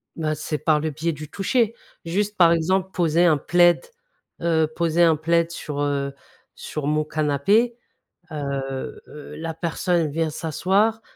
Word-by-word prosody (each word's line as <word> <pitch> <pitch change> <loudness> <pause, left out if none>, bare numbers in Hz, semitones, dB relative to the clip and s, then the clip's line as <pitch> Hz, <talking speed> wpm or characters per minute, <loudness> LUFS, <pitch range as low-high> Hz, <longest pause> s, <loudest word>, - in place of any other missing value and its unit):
Ben 155 -2 -1
c'est 150 0 -4
par 155 -1 +2
le 155 0 -2
biais 165 +4 -2
du 150 0 -8
toucher, 225 +5 +1 0.3
juste 205 +5 -1
par 170 -2 +6
exemple, 185 +3 +1
poser 170 0 +2
un 155 -4 +4
plaid, 175 +3 +3 0.6
heu, 160 -2 +2
poser 170 0 +1
un 165 -1 +5
plaid 170 +2 +1
sur, 150 -3 -5
heu, 140 -1 -1 0.4
sur 150 -2 -6
mon 155 +1 +1
canapé, 155 - +1 0.6
heu 135 -2 -4
heu, 150 0 -10
la 165 0 -4
personne 170 0 0
vient 160 +1 0
s'asseoir, 190 +8 0
160 Hz, 150 wpm, -23 LUFS, 150-175 Hz, 0.6 s, par